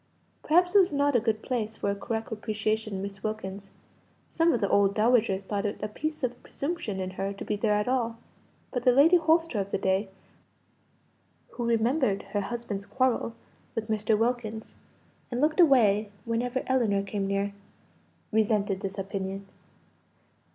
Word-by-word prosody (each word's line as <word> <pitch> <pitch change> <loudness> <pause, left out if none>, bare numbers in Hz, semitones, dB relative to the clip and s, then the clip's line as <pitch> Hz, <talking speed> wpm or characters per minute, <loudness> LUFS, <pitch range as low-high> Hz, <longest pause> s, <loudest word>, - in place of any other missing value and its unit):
Perhaps 355 +3 +3
it 405 - +8
was 365 -4 +4
not 285 -1 +2
a - - +6
good 220 -1 -1
place 220 -4 -2
for 200 - 0
a - - -2
correct 225 +2 -4
appreciation 215 -1 -2
of 190 - -3
Miss 195 -1 -7
Wilkins; 200 -2 -5 0.6
some 330 +1 +3
of 240 - +1
the 200 - +1
old 200 0 +3
dowagers 215 -3 +3
thought 200 +1 -2
it 205 -1 -2
a - - 0
piece 310 +8 -4
of 245 -1 -2
presumption 280 - -4
in 185 0 -3
her 195 +1 -3
to 200 - -8
be 210 - -1
there 210 0 +1
at 210 +2 0
all 235 -3 0 0.6
but 250 - -1
the 250 - +6
Lady 300 +8 +6
Holster 325 -6 +2
of 195 0 -2
the - - 0
day 190 +1 0 1.4
(who 240 - -4
remembered 235 -1 +1
her 205 - +1
husband's 205 -2 -5
quarrel 240 +1 0 0.4
with 220 0 -3
Mr. 215 0 +1
Wilkins, 225 -1 -2 0.6
and 245 - -3
looked 310 +4 +2
away 220 - +5 0.2
whenever 245 +3 -1
Ellinor 225 -7 +2
came 195 0 -3
near) 200 +1 -1 0.8
resented 210 -3 +1
this 195 0 -5
opinion. 195 0 -4
220 Hz, 165 wpm, -28 LUFS, 200-250 Hz, 1.4 s, it